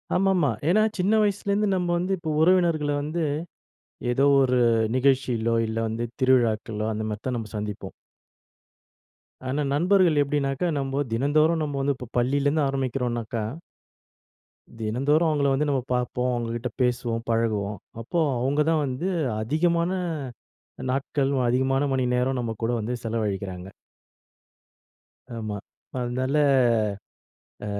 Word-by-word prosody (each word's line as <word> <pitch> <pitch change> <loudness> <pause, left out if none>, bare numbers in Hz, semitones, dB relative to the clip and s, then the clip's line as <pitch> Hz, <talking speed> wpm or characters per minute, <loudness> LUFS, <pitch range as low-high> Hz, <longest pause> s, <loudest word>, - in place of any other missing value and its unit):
ஆமாமா. 185 -6 +3 0.2
ஏன்னா 215 +5 +4 0.2
சின்ன 195 +4 +2
வயசுலேந்து 205 +1 0
நம்ம 180 -1 -1
வந்து 180 +2 -2
இப்போ 165 -2 -5
உறவினர்கள 165 -4 +3
வந்து, 160 +3 -2 0.9
ஏதோ 135 +3 +2 0.2
ஒரு 125 -1 +2 0.4
நிகழ்ச்சியிலோ 125 -4 +2
இல்ல, 110 0 -4
வந்து 115 +2 -2 0.2
திருவிழாக்களோ 115 -4 +2
அந்த 110 0 -3
மாரித்தான் 120 +4 -3
நம்ம 110 -2 -6
சந்திப்போம். 105 -1 -5 1.6
ஆனா, 140 +3 -1
நண்பர்கள் 175 0 +3
எப்டினாக்கா 140 +2 0
நம்பொ 135 0 -2
தினந்தோறும் 155 +6 +2
நம்ப 145 -2 -3
வந்து 140 0 +1
இப்ப் 125 -1 -11
பள்ளிலருந்து 140 +5 +2
ஆரம்பிக்கிறோம்னாக்கா 125 -4 -2 1.4
தினந்தோறும் 140 +9 +1
அவங்கள 145 -2 +1
வந்து 150 +3 +1
நம்ம 135 -2 +1
பாப்போம், 125 0 -1
அவங்ககிட்ட 120 +1 -3
பேசுவோம், 120 -2 0
பழகுவோம். 110 -3 0 0.2
அப்போ 170 +9 -1 0.2
அவுங்க 140 +4 +1
தான் 160 -2 +2
வந்து 135 +8 -2 0.3
அதிகமான 170 +7 +1 1.0
நாட்கள், 135 +1 0 0.2
அதிகமான 130 +2 +1
மணிநேரம் 125 0 +1
நம்ம 115 -2 -2
கூட 120 - +1
வந்து 110 +3 -3
செலவழிக்கிறாங்க. 100 -5 -3 1.7
ஆமா. 110 -2 -4 0.4
அதனால 130 +3 -1 1.3
அ - - -4
130 Hz, 110 wpm, -25 LUFS, 115-150 Hz, 1.7 s, ஏன்னா